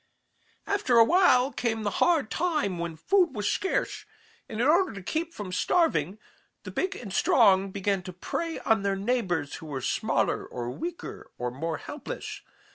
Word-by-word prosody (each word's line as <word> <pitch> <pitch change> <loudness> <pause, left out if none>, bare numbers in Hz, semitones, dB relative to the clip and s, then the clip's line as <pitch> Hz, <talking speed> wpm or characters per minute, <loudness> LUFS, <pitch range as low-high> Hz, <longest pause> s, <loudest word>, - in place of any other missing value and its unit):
"After 330 -12 +2
a 230 - +9
while 275 -4 +4
came 225 -3 -1
the 205 - 0
hard 320 -10 +3
time 305 - 0
when 170 -1 -3
food 345 - +2
was 210 -1 -1
scarce, 385 - -1 0.5
and 220 - -5
in 240 - +2
order 350 +6 +4
to 200 -2 -8
keep 325 - -2
from 205 - -7
starving, 185 - +1 0.5
the - - -7
big 380 +1 -1
and 205 - -8
strong 195 0 +4
began 195 0 -1
to 180 0 -8
prey 325 - -3
on 225 -3 +2
their 200 0 0
neighbors 195 - -1
who 160 - -10
were 140 -3 -4
smaller - - 0
or 120 -1 -5
weaker 340 - -6
or 125 0 -3
more 160 +5 -3
helpless. 305 - -7
220 Hz, 170 wpm, -27 LUFS, -, 0.5 s, a